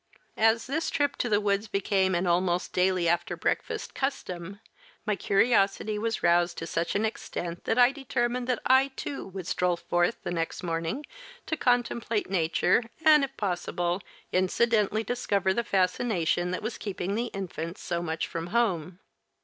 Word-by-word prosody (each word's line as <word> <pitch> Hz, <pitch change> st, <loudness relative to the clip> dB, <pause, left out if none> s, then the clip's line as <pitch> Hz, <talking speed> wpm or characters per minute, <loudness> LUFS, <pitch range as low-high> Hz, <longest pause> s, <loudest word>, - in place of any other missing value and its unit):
As 225 Hz, +1 st, +4 dB
this 315 Hz, +5 st, -1 dB
trip 285 Hz, -2 st, 0 dB
to 240 Hz, -, -1 dB
the 205 Hz, -1 st, +3 dB
woods 205 Hz, +1 st, 0 dB
became 195 Hz, -2 st, +1 dB
an 175 Hz, +2 st, 0 dB
almost 175 Hz, 0 st, +1 dB
daily 180 Hz, -1 st, +2 dB
after 170 Hz, +1 st, 0 dB
breakfast 445 Hz, -2 st, -2 dB
custom 195 Hz, -8 st, -4 dB, 0.5 s
my 210 Hz, -3 st, +1 dB
curiosity 205 Hz, 0 st, +2 dB
was 225 Hz, +1 st, -2 dB
roused 175 Hz, 0 st, +3 dB
to 165 Hz, -, -4 dB
such 165 Hz, 0 st, -2 dB
an 210 Hz, +2 st, +2 dB
extent 175 Hz, -5 st, -5 dB
that 225 Hz, -, +1 dB
I 245 Hz, +1 st, +7 dB
determined 250 Hz, -2 st, -2 dB
that 250 Hz, -2 st, -1 dB
I, 265 Hz, +1 st, +5 dB
too, 280 Hz, -, -5 dB
would 190 Hz, -2 st, -7 dB
stroll 180 Hz, 0 st, +1 dB
forth 175 Hz, +5 st, 0 dB
the -, -, -3 dB
next 165 Hz, +1 st, -3 dB
morning 165 Hz, -, -2 dB, 0.4 s
to 320 Hz, -, -1 dB
contemplate 235 Hz, -6 st, 0 dB
nature, 175 Hz, +3 st, +2 dB, 0.2 s
and 305 Hz, -2 st, +7 dB
if 270 Hz, 0 st, -4 dB
possible, 175 Hz, -1 st, -1 dB, 0.3 s
incidentally 215 Hz, +3 st, +2 dB
discover 200 Hz, -6 st, 0 dB
the 235 Hz, -, 0 dB
fascination 180 Hz, -3 st, +1 dB
that 185 Hz, +3 st, -3 dB
was 220 Hz, +2 st, -4 dB
keeping 195 Hz, -2 st, -3 dB
the 230 Hz, +3 st, 0 dB
infants 180 Hz, -4 st, -6 dB
so 170 Hz, -1 st, -2 dB
much 160 Hz, -1 st, -2 dB
from 165 Hz, 0 st, -5 dB
home. 185 Hz, -6 st, 0 dB
195 Hz, 160 wpm, -28 LUFS, 175-235 Hz, 0.5 s, I